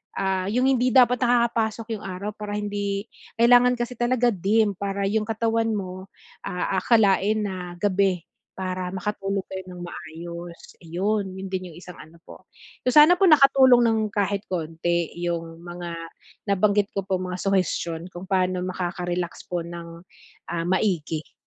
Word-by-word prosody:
ah, 190 -1 -1
yung 240 +5 +1
hindi 255 -1 +3
dapat 250 -1 +6
nakakapasok 230 -2 +1
yung 210 - -11
araw 190 +3 -4
para 210 0 -6
hindi 205 -1 -2 0.3
kailangan 245 +2 +5
kasi 240 0 -5
talaga 240 0 +2
dim 205 +2 +2
para 200 0 -2
yung 215 0 0
katawan 225 0 0
mo 185 -1 -6 0.4
aakalain 200 +2 +2
na 180 -3 -5
gabi 190 -2 +1 0.3
para 185 -1 -3
makatulog 195 0 -2
kayo 190 0 -5
ng 180 -1 -9
maayos, 170 +1 -9
iyon 190 +3 -2
'yon 190 0 -6
din 185 -1 -3
yung - - -14
isang 180 0 -11
ano 160 +2 -13
po. - - -14 0.4
So, - - +6
sana 310 +4 +8
po 390 - +5
nakatulong 270 -5 +6
ng 225 -1 +2
kahit 200 0 -1
konti 170 -1 -1
yung 165 -1 -3
mga 175 0 -6 0.6
nabanggit 200 +1 +2
ko 195 - -1
po 190 -1 -1
mga 180 0 -4
suhestiyon 175 -3 -1
kung 175 - -8
paano 185 -1 +1
makakarelax 180 -1 -3
po 175 - 0
ng, 170 -1 -9 0.5
ah 170 -1 -1
maigi. 170 -4 -1
195 Hz, 150 wpm, -24 LUFS, 180-220 Hz, 0.6 s, sana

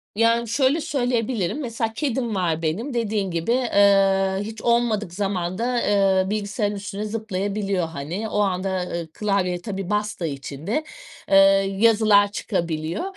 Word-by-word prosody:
Yani 230 +2 +2
şöyle 270 +7 +2
söyleyebilirim, 245 - -1
mesela 230 -3 -3
kedim 240 -4 -2
var 165 -4 0
benim. 200 - -2
Dediğin 215 -5 -1
gibi, 165 +6 -1
eee, 195 -5 +3
hiç 220 +1 -7
olmadık 235 -6 +1
zamanda, 200 +5 -1
eee, 195 -2 +3
bilgisayarın 205 0 -2
üstüne 200 +1 -5
zıplayabiliyor 200 -3 -2
hani. 165 +8 -5
O 210 - -1
anda 190 -1 -1 0.3
klavyeye 195 -4 -1
tabii 195 -2 -5
bastığı 210 -4 -1
için 140 +2 -7
de, 300 +9 0 0.5
eee, 195 - +4 0.4
yazılar 210 -2 +5
çıkabiliyor. 170 - -2
205 Hz, 130 wpm, -23 LUFS, 185-225 Hz, 0.5 s, yazılar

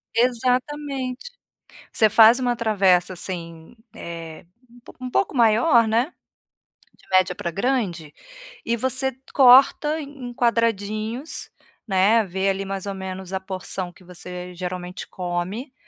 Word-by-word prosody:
Exatamente. 255 - -1 0.6
Você 220 -2 +3
faz 225 +3 +7
uma 245 -1 0
travessa, 195 -6 +2
assim, 170 +1 -5 0.2
eh, 165 -1 -8 0.2
um 245 +1 -18
po - - -15
um 255 - -4
pouco 335 +2 0
maior, 230 +1 +4
né, 235 +9 0 0.8
de - - -25
média 185 -1 +3
pra 170 - -4
grande, 195 - -2 0.5
e 230 - +1
você 260 +2 0 0.2
corta 275 +4 +6
em 275 -4 -8
quadradinhos, 230 +2 -1 0.4
né. 200 +4 +3
Vê 190 +1 -1
ali 195 0 -2
mais 195 0 -5
ou 200 - -3
menos 190 0 -7
a 190 - -1
porção 185 -1 -5
que - - -20
você 180 0 -8
geralmente 180 0 -6
come, 185 +8 -4
215 Hz, 130 wpm, -23 LUFS, 185-250 Hz, 0.8 s, faz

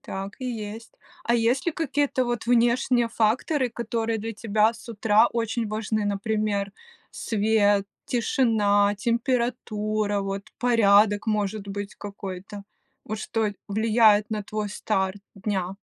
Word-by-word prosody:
Так 195 +1 -6
и - - -4
есть. 225 -1 -6 0.3
А 235 - +2
есть 240 +6 +1
ли 340 - +1
какие-то 285 -4 0
вот 240 -1 -3
внешние 240 0 +3
факторы, 245 +5 +1
которые 230 -1 -2
для 225 +2 -4
тебя 215 0 +2
с 235 - -14
утра 215 -1 +4
очень 230 -1 -1
важны, 215 0 -1
например: 205 0 -1 0.4
свет, 205 -2 +1 0.2
тишина, 210 -5 +2
температура, 215 -3 -1
вот, 195 0 -3 0.2
порядок, 210 -3 +4
может 210 -1 -1
быть, 200 0 -5
какой-то? 200 0 -8 0.4
Вот 215 0 -4
что 220 -1 -1 0.2
влияет 215 0 +4
на 210 -1 -2
твой 210 0 -4
старт 195 -1 -1
дня? 195 -2 -3
215 Hz, 125 wpm, -25 LUFS, 205-235 Hz, 0.4 s, утра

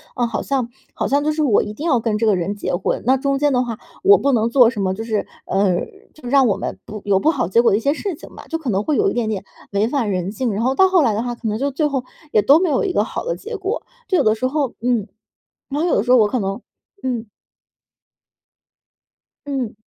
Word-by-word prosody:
啊， 245 - +1
好 225 -3 -3
像 265 -4 -1 0.3
好 - - -1
像 285 +1 +1
就 305 - +1
是 310 - -1
我 235 -8 +4
一 210 - -6
定 290 +9 -6
要 255 -7 +3
跟 220 -2 -1
这 225 - +1
个 210 - +4
人 190 +3 -2
结 - - -3
婚， - - -1
那 260 - +4
中 275 +1 0
间 290 0 +2
的 250 0 +2
话 230 -3 -5 0.3
我 400 +1 +8
不 280 - +1
能 230 -2 +2
做 250 -1 +6
什 220 - -6
么， 190 -1 0
就 220 - -5
是， 220 -3 -1 0.2
呃， 190 -2 +1 0.4
就 280 -5 -10
让 270 -1 +5
我 205 - +1
们 - - -5
不 215 0 -7
有 195 -2 +3
不 305 - +2
好 170 - -1
结 230 +6 +4
果 240 - +4
的 200 - +3
一 - - -1
些 280 +6 +1
事 390 +4 -4
情 - - -13
吧， - - -11
就 325 - -1
可 290 -6 -4
能 195 +1 0
会 300 - 0
有 415 - +3
一 - - -3
点 235 -3 -1
点 200 -3 -3 0.3
违 205 +2 +1
反 250 -5 -1
人 185 +1 -2
性， 240 +2 -2
然 210 +3 -1
后 260 +2 +2
到 380 +7 +5
后 370 -2 +4
来 230 -5 +2
的 210 - -1
话， 240 0 -3
可 235 - -5
能 215 +1 -1
就 280 +2 0
最 290 +3 -1
后 270 -3 -2 0.3
也 210 - +4
都 280 +7 +6
没 360 -1 +1
有 265 - +1
一 385 - 0
个 - - +2
好 - - -5
的 - - -2
结 450 0 -7
果， 400 +4 -3 0.2
就 370 - +2
有 - - +3
的 215 - +4
时 225 +4 -1
候 275 -2 -1
嗯。 240 -4 0 0.6
然 285 +2 -2
后 345 - +1
有 - - +2
的 200 - +2
时 245 - -2
候 255 - +7
我 215 - +5
可 250 - -1
能 195 +2 -3 0.4
嗯。 245 -3 -2 2.2
嗯。 265 -6 -3
245 Hz, 295 characters per minute, -20 LUFS, 215-285 Hz, 2.2 s, 我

